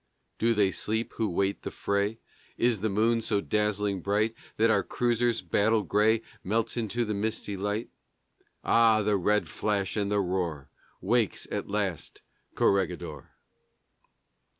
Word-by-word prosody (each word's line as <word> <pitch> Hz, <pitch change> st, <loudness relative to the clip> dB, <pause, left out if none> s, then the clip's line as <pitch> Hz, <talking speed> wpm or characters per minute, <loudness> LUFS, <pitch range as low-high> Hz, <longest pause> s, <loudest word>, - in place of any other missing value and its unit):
Do 115 Hz, +1 st, +2 dB
they 100 Hz, -2 st, +3 dB
sleep 110 Hz, +4 st, -2 dB
who 110 Hz, -2 st, 0 dB
wait 95 Hz, +3 st, 0 dB
the -, -, -4 dB
fray? 100 Hz, +2 st, -1 dB, 0.4 s
Is 120 Hz, -5 st, +1 dB
the 110 Hz, -, 0 dB
moon 115 Hz, +3 st, +2 dB
so 105 Hz, -2 st, 0 dB
dazzling 105 Hz, -2 st, 0 dB
bright 105 Hz, +4 st, +1 dB, 0.2 s
That 115 Hz, +1 st, +4 dB
our -, -, +3 dB
cruisers' 120 Hz, -2 st, 0 dB
battle 105 Hz, +5 st, +2 dB
gray 105 Hz, +4 st, +2 dB, 0.2 s
Melts 110 Hz, +4 st, 0 dB
into 120 Hz, 0 st, -1 dB
the 105 Hz, -, -2 dB
misty 105 Hz, 0 st, -3 dB
light?... 105 Hz, +3 st, -3 dB, 0.7 s
Ah! 115 Hz, -2 st, +4 dB
the 105 Hz, 0 st, +2 dB
red 105 Hz, +3 st, +1 dB
flash 100 Hz, -3 st, -1 dB
and 100 Hz, -1 st, -1 dB
the 105 Hz, -, +2 dB
roar! 90 Hz, -7 st, -2 dB, 0.3 s
Wakes -, -, +1 dB
at -, -, -3 dB
last 100 Hz, -5 st, -3 dB, 0.3 s
Corregidor! 85 Hz, -7 st, 0 dB
105 Hz, 140 wpm, -28 LUFS, 100-110 Hz, 0.7 s, That